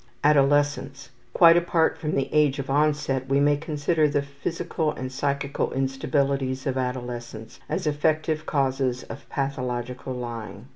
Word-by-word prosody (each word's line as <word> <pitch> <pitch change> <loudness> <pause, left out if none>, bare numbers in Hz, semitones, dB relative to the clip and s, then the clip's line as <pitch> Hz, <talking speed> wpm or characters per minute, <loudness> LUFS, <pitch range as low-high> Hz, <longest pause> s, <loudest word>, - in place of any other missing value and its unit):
Adolescence. 145 -2 +2 0.2
Quite 165 +4 +7
apart 170 -1 +2
from 150 -1 -3
the 135 -1 0
age 150 -3 +3
of 135 -1 -4
onset, 145 -3 +1
we 135 +1 +3
may 145 +1 +4
consider 155 +1 0
the 145 -1 0
physical 155 +3 -3
and 130 -2 -6
psychical 140 +1 -1
instabilities 135 0 -1
of 135 - -1
adolescence 120 -3 -5
as 180 - -2
effective 155 +1 0
causes 130 -2 0
of - - -10
pathological 125 -2 -3
lying. 115 -2 -7
140 Hz, 135 wpm, -25 LUFS, 130-150 Hz, 0.2 s, Quite